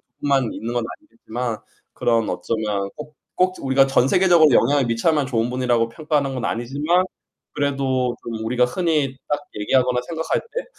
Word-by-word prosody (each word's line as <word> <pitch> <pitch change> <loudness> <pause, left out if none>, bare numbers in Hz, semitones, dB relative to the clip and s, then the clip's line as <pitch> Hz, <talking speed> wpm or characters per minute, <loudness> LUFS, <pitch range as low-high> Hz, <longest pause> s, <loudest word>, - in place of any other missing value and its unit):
그분들만 135 -1 -1
있는 115 +2 -5
건 120 -1 0
아니겠지만 125 - -6 0.3
그런 115 -2 +1
어쩌면 105 -3 -2
꼭 150 0 -9 0.2
꼭 185 0 +2
우리가 135 0 +4
전 135 -1 +3
세계적으로 175 -1 +5
영향을 140 +2 +3
미쳐야만 135 +5 +1
좋은 120 -1 0
분이라고 125 -2 +1
평가하는 145 0 -1
건 125 - -4
아니지만 145 +11 0 0.5
그래도 135 -3 0
좀 110 -1 -5
우리가 125 +2 +2
흔히 145 -1 0
딱 145 0 0 0.2
얘기하거나 125 +3 +2
생각할 160 -1 -1
때 475 +2 -6
130 Hz, 385 characters per minute, -22 LUFS, 120-150 Hz, 0.5 s, 세계적으로